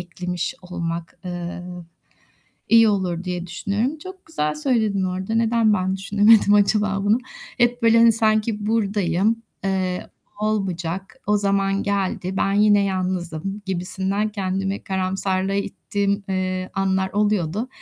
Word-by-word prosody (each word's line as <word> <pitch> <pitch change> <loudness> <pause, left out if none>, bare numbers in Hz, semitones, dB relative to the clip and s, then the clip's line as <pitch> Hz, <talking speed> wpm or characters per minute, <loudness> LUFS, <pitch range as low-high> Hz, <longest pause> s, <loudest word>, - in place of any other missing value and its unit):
eklemiş 180 0 -4
olmak, 170 -2 -5
eee, 175 -1 -5 1.1
iyi 230 -1 +7
olur 185 -4 -1
diye 180 -1 -3
düşünüyorum. 210 - -2
Çok 370 +4 -11
güzel 150 - -1
söyledin 210 - +1
orada. 185 +3 -2
Neden 225 -1 +3
ben 190 -1 0
düşünemedim 205 +2 +4
acaba 205 -1 +2
bunu? 210 +3 +4 0.4
Hep 240 0 +2
böyle 230 0 +5
hani 230 0 +7
sanki 215 -1 +1
burdayım, 210 0 +1 0.2
eee, 185 -2 -1 0.3
olmayacak, 195 -2 -2
o 210 +1 +3
zaman 195 0 +1
geldi, 190 -2 -2
ben 195 - +1
yine 205 0 +4
yalnızım 185 0 -3
gibisinden 190 +3 -1
kendimi 195 -1 -3
karamsarlığa 190 0 -1
ittiğim, 200 0 -2
eee, 185 -1 -2
anlar 190 -1 0
oluyordu. 210 +1 0
195 Hz, 120 wpm, -22 LUFS, 185-210 Hz, 1.1 s, iyi